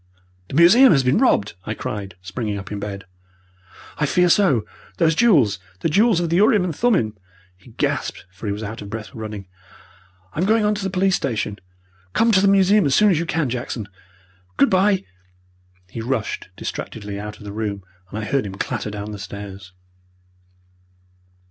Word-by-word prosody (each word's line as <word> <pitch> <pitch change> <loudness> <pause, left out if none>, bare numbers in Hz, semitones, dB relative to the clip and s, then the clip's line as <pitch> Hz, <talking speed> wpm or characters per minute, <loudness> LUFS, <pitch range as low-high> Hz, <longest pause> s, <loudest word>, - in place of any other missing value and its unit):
"The - - -7
museum 215 - +7
has 135 -3 +3
been 125 +2 +3
robbed!" 105 - +2
I 110 - -3
cried, 100 -4 -5
springing 105 +2 -3
up 100 0 -8
in 105 - -4
bed. 100 -2 -6 0.9
"I 150 - +2
fear 180 +4 +3
so! 165 - +3 0.3
Those 165 -2 +3
jewels! 150 - +4 0.2
The - - +1
jewels 205 +3 +4
of 170 -2 -2
the 170 - +3
urim 205 0 +4
and 175 -4 -3
thummim!" 180 - +1 0.4
he 95 +7 -19
gasped, 110 - -2
for 100 +4 -8
he - - 0
was 105 +2 -4
out 110 +2 -6
of 100 - -8
breath 110 0 -6
with 110 - -8
running. 105 -3 -6 0.9
"I'm 170 - 0
going 220 +1 +3
on 210 - +3
to 205 -1 -4
the 195 - -1
police 190 0 +2
station. 110 - -2 0.5
Come 230 0 +3
to 190 -3 +4
the 200 - +4
museum 195 -1 +4
as 135 - +2
soon 210 -1 +5
as 165 - +2
you 170 - -3
can, 160 -4 0
Jackson! 120 -3 -4 0.7
Good 140 - +4
bye!" 190 +1 +3 0.9
He 115 - -5
rushed 115 -5 -3
distractedly 100 -2 -6
out 105 0 -7
of - - -14
the 100 -1 -7
room, 105 -2 -3 0.3
and 105 - -6
I 110 - -3
heard 130 0 0
him 95 - -7
clatter 110 +1 -3
down 105 0 -6
the 105 - -7
stairs. 100 -2 -8
125 Hz, 185 wpm, -21 LUFS, -, 0.9 s, museum